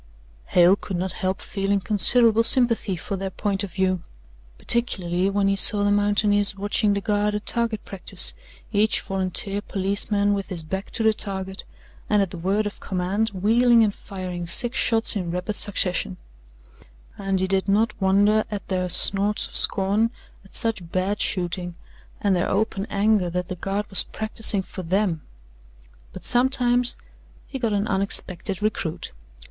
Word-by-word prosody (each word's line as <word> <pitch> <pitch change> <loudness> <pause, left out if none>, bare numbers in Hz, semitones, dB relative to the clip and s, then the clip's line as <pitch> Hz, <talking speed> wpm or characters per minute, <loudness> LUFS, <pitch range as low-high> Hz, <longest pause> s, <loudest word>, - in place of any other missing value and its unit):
Hale 180 +2 +5
could 195 -2 -6
not 185 +1 -3
help 185 +2 -3
feeling 200 0 -2
considerable 225 +3 +2
sympathy 230 -4 +3
for 180 +4 -5
their 195 0 -4
point 200 +1 -3
of 190 -4 -7
view 185 -2 0 0.6
particularly 190 -6 0
when 200 0 0
he 195 - +1
saw 205 +1 +7
the 205 - +2
mountaineers 205 0 +2
watching 205 +1 +1
the 200 - -2
Guard 210 0 0
at 210 - -5
target 230 -3 -2
practice 195 -2 -1 0.4
each 210 +1 +2
volunteer 195 +2 -3
policeman 200 +1 -1
with 200 -1 -3
his 175 -4 -4
back 190 +5 -5
to 225 - 0
the 220 0 +4
target, 190 -2 -6 0.4
and 210 - +3
at 195 -3 0
the 180 - -7
word 195 +5 0
of 205 - -6
command 190 +4 -2
wheeling 230 +4 +3
and 210 -2 0
firing 180 -4 -7
six 240 +8 +4
shots 225 0 +1
in 180 -4 -3
rapid 180 +4 -3
succession 185 -2 +1 1.0
and 195 -1 -1
he 190 - +1
did 190 +1 -1
not 215 +4 +2
wonder 205 +3 +3
at 205 -2 -6
their 185 -1 -1
snorts 200 +3 +3
of - - -13
scorn 205 +3 +3 0.3
at 195 - -16
such 215 -8 0
bad 195 +3 -1
shooting 175 -1 -2 0.4
and 200 -2 +1
their 175 - -1
open 200 0 -1
anger 200 -2 +1
that 180 +1 -4
the 185 - -4
Guard 195 +4 -3
was 195 - +6
practising 220 -2 -1
for 185 - -9
THEM. 180 -2 -1 0.9
But - - -10
sometimes 245 -1 +3 0.5
he 270 - -7
got 230 -4 -1
an 205 0 0
unexpected 190 -1 +1
recruit. 175 -6 -3
200 Hz, 160 wpm, -23 LUFS, 185-210 Hz, 1.0 s, saw